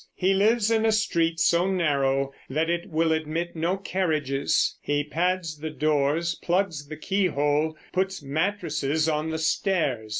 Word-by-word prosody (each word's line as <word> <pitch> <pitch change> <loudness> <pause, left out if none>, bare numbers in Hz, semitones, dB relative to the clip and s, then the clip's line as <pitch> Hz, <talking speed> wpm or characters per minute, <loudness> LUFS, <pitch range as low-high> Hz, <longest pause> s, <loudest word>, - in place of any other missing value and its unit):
He 190 +1 +2
lives 215 +3 +3
in 225 -1 +2
a 225 - +3
street 170 -6 +1
so 175 +2 +3
narrow 135 -6 +1 0.2
that 160 +5 0
it 170 0 -3
will 160 0 +1
admit 160 +2 -2
no 170 +4 0
carriages; 155 -8 0
he 145 0 0
pads 165 0 -1
the 155 +1 -4
doors; 155 +2 +1
plugs 175 -5 -1
the 155 +1 -7
keyhole; 155 -4 0 0.2
puts 190 -3 -1
mattresses 155 -1 -1
on 155 0 0
the 160 - -2
stairs. 155 - 0
160 Hz, 145 wpm, -25 LUFS, 150-185 Hz, 0.2 s, lives